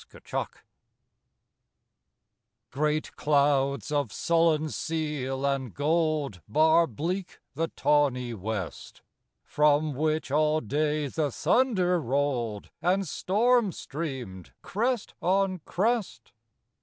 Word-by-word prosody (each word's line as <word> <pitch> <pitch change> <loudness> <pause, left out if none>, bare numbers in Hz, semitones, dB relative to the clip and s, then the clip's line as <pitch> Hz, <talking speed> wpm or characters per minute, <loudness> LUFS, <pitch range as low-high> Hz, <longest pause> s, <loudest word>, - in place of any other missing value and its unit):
AFTER - - -11
STORM - - -2 2.2
Great 150 +2 -1
clouds 140 -4 +2
of 145 -7 0
sullen 165 0 +2
seal 150 -5 -3
and 135 -5 -1
gold 150 - 0
Bar 160 +7 +4
bleak 175 - -4
the 165 +4 -1
tawny 135 -6 +1
west, 100 -3 -6 0.4
From 150 0 +2
which 155 +1 -1
all 155 +1 +3
day 150 +4 0
the 145 +2 -1
thunder 185 - +2
rolled, 125 -6 -1
And 190 +2 +1
storm 220 - +2
streamed, 135 - -6
crest 235 +3 -1
on 185 +1 +1
crest. 195 - -1
150 Hz, 95 wpm, -27 LUFS, 135-170 Hz, 2.2 s, Bar